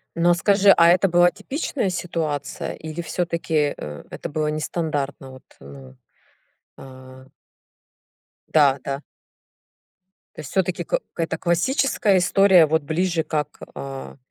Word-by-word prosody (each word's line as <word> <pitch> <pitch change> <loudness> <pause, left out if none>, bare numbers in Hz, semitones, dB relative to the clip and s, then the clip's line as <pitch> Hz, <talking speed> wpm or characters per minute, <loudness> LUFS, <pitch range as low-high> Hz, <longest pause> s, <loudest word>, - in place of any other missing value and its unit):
Но 175 +1 +3
скажи, 195 +3 +4
а 170 - +6
это 180 +3 +4
была 175 +1 +4
типичная 275 -6 -3
ситуация 165 -5 -3
или 160 +1 -7
всё-таки, 165 -4 -1
э, 75 0 -8
это - - -7
было 155 0 -2
нестандартно? 150 -3 -3
Вот, 130 - -14 0.2
э, 70 -1 -12 0.9
а 130 0 -13 1.3
Да-да. 140 -2 +2 1.3
То - - -13
есть 145 - -10
всё-таки 185 -2 -1
кы - - -1 0.2
это 165 -1 -2
классическая 205 - +1
история, 185 -1 +5
вот 160 0 0
ближе 165 +2 -1
как, 150 -2 -3 0.2
а, 135 0 -8
160 Hz, 115 wpm, -22 LUFS, 140-175 Hz, 1.3 s, а